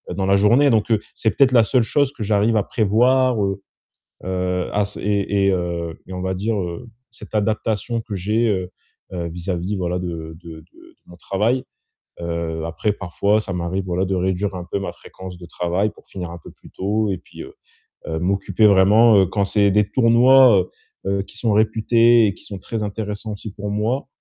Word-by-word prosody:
dans 95 - -1
la 100 - +4
journée. 120 +8 +4
Donc, 110 -1 +1
heu, 110 - +4 0.2
c'est 110 - 0
peut-être 130 -2 +3
la 115 -2 +6
seule 125 -1 +2
chose 140 +3 +1
que 125 - -12
j'arrive 105 +2 +2
à 100 - +2
prévoir, 120 +2 +2
heu, 95 0 -2 0.6
heu, 90 -1 -2
à 105 - +1
s 100 +1 -5
et 100 -1 0
et - - +4
heu, 85 -2 -3
et 95 - -10
on 90 - -5
va 95 0 -2
dire, 105 +4 -1
heu, 90 +7 -6 0.2
cette 115 - -13
adaptation 110 +2 -1
que 110 - -7
j'ai, 110 +5 0
heu, 95 -3 -2 0.4
heu, 85 -2 -4
vis-à-vis, 90 +3 -4
voilà, 90 -1 -2
de 80 -3 -6
de 80 -2 -10
de - - -18
de 85 - -20
mon 90 - -14
travail. 110 +8 0 0.6
Heu, 85 -1 -3
après 85 +6 -1
parfois, 100 +3 0
ça 95 - -6
m'arrive 90 +2 -3
voilà 90 +1 0
de 95 - -1
réduire 95 +2 -1
un 90 - -6
peu - - -1
ma 90 -3 -4
fréquence 90 +1 -11
de 85 - -11
travail 90 +5 -1
pour - - -21
finir 90 -3 -6
un 85 - -8
peu - - -11
plus - - -18
tôt 105 +2 -1
et 95 - -2
puis, 90 - -12
heu, 390 +2 -12 0.5
heu, 80 - -2
m'occuper 100 +4 +2
vraiment. 105 +3 +5
Heu, 95 - +5
quand 100 +1 0
c'est 100 0 +2
des 105 0 +2
tournois, 120 -4 +5 0.4
heu, 100 0 0
qui 110 - -15
sont 115 -2 0
réputés 115 +1 +4
et 100 - -1
qui - - -17
sont 100 -2 -7
très 110 +3 -4
intéressants 105 +1 -5
aussi 105 +1 -8
pour 105 0 -5
moi. 115 +7 -1
100 Hz, 205 wpm, -21 LUFS, 90-110 Hz, 0.6 s, la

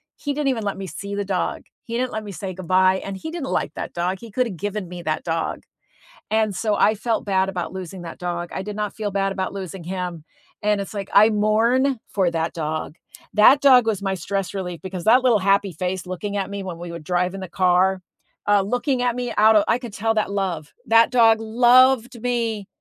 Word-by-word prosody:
he 290 - -3
didn't 295 0 -1
even 235 -4 -1
let 200 -1 -2
me 195 0 -6
see 200 +3 -7
the 205 0 -2
dog, 185 -3 -2 0.2
he 230 0 -4
didn't 255 0 -1
let 220 - -3
me 205 - -7
say 190 +1 -5
goodbye, 185 +1 +2
and 195 -1 -5
he 320 - -6
didn't 325 -6 -5
like - - -1
that - - -5
dog. 180 +2 -1
He 230 -3 -11
could 250 +3 +1
have 190 -6 -7
given 205 +1 -4
me 180 -1 -7
that 155 0 -2
dog, 165 -1 -2 0.7
and 220 -2 +1
so 215 +3 0
I 215 - +4
felt 225 +1 -1
bad 190 -1 +1
about 175 -3 -4
losing 185 -1 -7
that 165 -1 -8
dog, 175 -1 -4
I 190 - -3
did 205 +1 -6
not 210 -1 -3
feel 215 -2 -2
bad 195 0 0
about 190 -1 -3
losing 190 -2 -6
him, 180 -2 -4 0.4
and 210 -1 +1
it's 200 - -6
like 200 -1 -4
I 215 +2 +7
mourn 230 +5 +2
for 190 -3 +1
that 165 0 -2
dog, 155 -1 -4 0.4
that 235 +7 +7
dog 255 -4 +6
was 220 -4 0
my 195 -1 -1
stress 195 0 -3
relief 180 -3 -4
because 185 -2 -6
that 245 +4 +5
little 240 -4 +5
happy 195 0 +2
face 180 +2 -3
looking 200 +3 -4
at 195 -1 -2
me 200 0 -4
when 180 -3 -6
we 170 0 -7
would 170 -1 -7
drive 180 +2 0
in 195 - -6
the 185 - -6
car, 185 +1 +2 0.5
uh, 205 -1 +5
looking 245 +5 -1
at 245 -1 0
me 245 -1 -3
out 220 +1 +6
of 205 - +5
I 230 - +3
could 240 -4 -8
tell 225 +1 0
that 215 -2 0
love, 180 -7 -3
that 230 0 +5
dog 225 -3 +5
loved 245 +1 +4
me. 230 -4 -1
200 Hz, 230 wpm, -22 LUFS, 185-225 Hz, 0.7 s, I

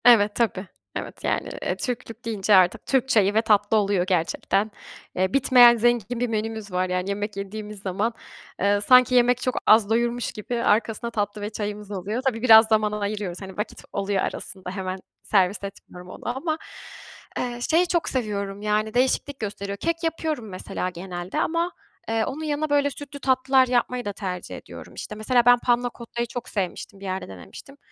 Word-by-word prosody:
Evet, 210 -4 +6
tabii. 210 -5 0 0.3
Evet, - - -6
yani, - - -1
eee, - - -1
Türklük 235 -3 -5
deyince 210 -2 +2
artık 185 -1 +4
Türk 265 -1 +1
çayı 205 -4 +4
ve 220 - +4
tatlı 210 -1 +3
oluyor 200 -3 +2
gerçekten. 190 +4 0 0.4
Eee, 185 +1 0
bitmeyen 250 -3 +7
zengin 240 0 +1
bir 245 - +1
menümüz 220 -2 -3
var. 180 0 0
Yani, 180 +1 -1
yemek 205 0 -3
yediğimiz 210 +1 -6
zaman, 200 +4 -1 0.5
eee, 200 +1 +3
sanki 250 +3 +6
yemek 245 0 +4
çok 255 - -1
az 215 -1 +6
doyurmuş 235 +1 0
gibi 235 +3 -4
arkasına 225 +2 +1
tatlı 205 -1 -2
ve 205 - -3
çayımız 210 -1 -5
oluyor. 205 +5 -3
Tabii, 230 -3 0
biraz 225 -2 +8
zaman 215 -1 +2
ayırıyoruz, 205 -3 -3
hani, 190 -1 -9
vakit 210 +1 -5
oluyor 195 -1 0
arasında 190 -2 -5
hemen 185 0 -4 0.3
servis 195 0 +2
etmiyorum 180 -2 -9
onu 245 +6 -5
ama, 315 +2 -1 0.8
eee, 245 -1 -3
şeyi 345 +3 +4
çok 340 -2 0
seviyorum 200 -5 -3
Yani, 215 +1 0
değişiklik 265 +2 +1
gösteriyor. 200 -1 -4
Kek 335 - -2
yapıyorum 315 -8 -2
mesela 185 -1 -4
genelde 175 0 -5
ama, 335 +2 0 0.4
eee, 225 -1 +1
onun 290 +4 -5
yanına, 305 0 -1
böyle, 285 0 +3
sütlü 285 0 -9
tatlılar 260 0 +3
yapmayı 250 0 0
da 205 - -3
tercih 185 -3 -5
ediyorum. - - -11
İşte, 210 - -7
mesela 235 +3 +2
ben 245 0 +7
Panna 245 0 +1
Cotta'yı 235 0 -4
çok 240 +1 -6
sevmiştim, 195 0 -4
bir 200 - -9
yerde 190 0 -3
denemiştim. 95 - -12
215 Hz, 175 wpm, -24 LUFS, 200-245 Hz, 0.8 s, biraz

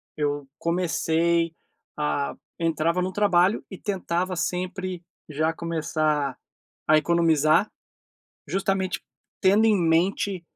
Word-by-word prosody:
eu 145 -2 -2
comecei 170 -1 +1 0.4
a 150 -1 -1 0.2
entrava 165 +1 +1
no 185 +1 -2
trabalho 195 -1 +3
e 190 - -7
tentava 185 -2 -2
sempre 180 0 -3 0.3
já 155 +2 0
começar 155 -4 -1 0.5
a 155 - +6
economizar, 155 -1 +3 0.8
justamente 190 +2 -1 0.4
tendo 205 +4 +4
em 215 -2 +4
mente 180 +2 +1
170 Hz, 95 wpm, -25 LUFS, 155-185 Hz, 0.8 s, a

